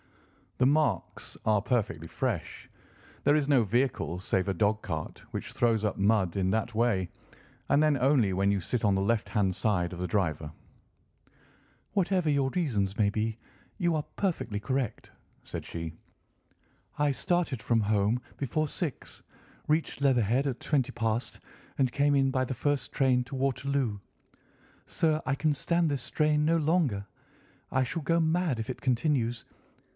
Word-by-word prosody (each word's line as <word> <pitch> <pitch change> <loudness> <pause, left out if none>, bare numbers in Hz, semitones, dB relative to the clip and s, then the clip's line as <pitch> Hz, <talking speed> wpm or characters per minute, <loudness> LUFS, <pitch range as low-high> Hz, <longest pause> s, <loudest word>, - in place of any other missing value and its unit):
The 125 - +3
marks 140 - 0
are 105 -2 +3
perfectly 100 -8 -1
fresh. - - -3 0.5
There 145 - +4
is 150 -2 +1
no 135 -5 +4
vehicle 115 -5 0
save 95 +1 0
a 95 - +1
dog 105 +4 +1
cart 80 -4 -5
which - - -5
throws 115 -3 +2
up 105 - -1
mud 100 -3 +2
in 95 -1 +1
that 110 +2 -1
way, 105 -6 +1 0.6
and 145 - +4
then 155 -2 +3
only 130 -6 +3
when 100 +2 +2
you 100 - +1
sit 115 +6 -2
on 100 - +4
the 95 - +1
left 110 +2 0
hand 95 -3 +1
side 90 -5 0
of 90 - -7
the 90 - -2
driver." 80 -5 -1 1.4
"Whatever 185 -4 +1
your 140 -2 +2
reasons 105 - -1
may 105 -2 +3
be, 110 +1 -2 0.4
you 175 -4 +1
are 150 - -1
perfectly 160 - -1
correct," 130 +2 -3 0.3
said - - -6
she. 85 -1 -5 1.0
"I 145 -1 +2
started 145 -4 0
from 115 +2 +2
home 105 +2 +2 0.2
before 150 +3 -1
six, 155 -1 -5 0.4
reached 155 -2 0
Leatherhead 125 -1 +3
at 130 -3 -2
twenty 140 -6 0
past, 115 0 -2 0.4
and 130 -3 +2
came 145 +3 +2
in 135 -1 +3
by 130 0 +1
the 130 - -4
first 145 +3 -1
train 130 -2 +2
to 125 - -7
Waterloo. 135 -4 -1 0.9
Sir, 155 -1 +1
I 130 - +1
can 150 +2 +1
stand 170 +3 +1
this 140 -4 -1
strain 150 0 +1
no 165 +2 +3
longer; 150 - +1 0.7
I 130 - +2
shall 150 +6 -3
go 165 +3 +2
mad 160 -5 +1
if 110 - -4
it 130 - -5
continues. 120 -3 0
125 Hz, 160 wpm, -29 LUFS, 105-145 Hz, 1.4 s, There